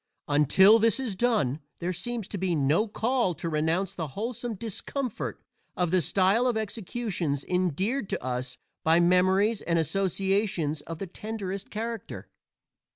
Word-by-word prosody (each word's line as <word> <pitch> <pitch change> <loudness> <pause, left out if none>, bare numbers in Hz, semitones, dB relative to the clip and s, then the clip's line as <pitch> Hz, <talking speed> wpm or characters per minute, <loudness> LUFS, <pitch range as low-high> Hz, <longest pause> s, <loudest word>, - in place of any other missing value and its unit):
Until 170 - +6
this 225 +3 +2
is 240 -7 -3
done 185 - +1 0.2
there 180 +2 -2
seems 235 +2 -4
to 200 - -4
be 180 -2 0
no 150 +9 +2
call 225 -3 0
to 170 - -4
renounce 165 +5 0
the 165 -4 -4
wholesome 235 +1 -3
discomfort 230 +4 -4 0.4
of 180 -2 +1
the 185 -1 +4
style 195 - +3
of 240 -3 +1
executions 200 - -2
endeared 185 - 0
to - - -3
us 125 0 -3 0.3
by 165 +1 +5
memories 185 +5 +3
and 170 -1 0
associations 190 -2 0
of 165 +1 -7
the 195 - -4
tenderest 200 0 -5
character. 225 +2 -5
190 Hz, 145 wpm, -27 LUFS, 165-220 Hz, 0.4 s, Until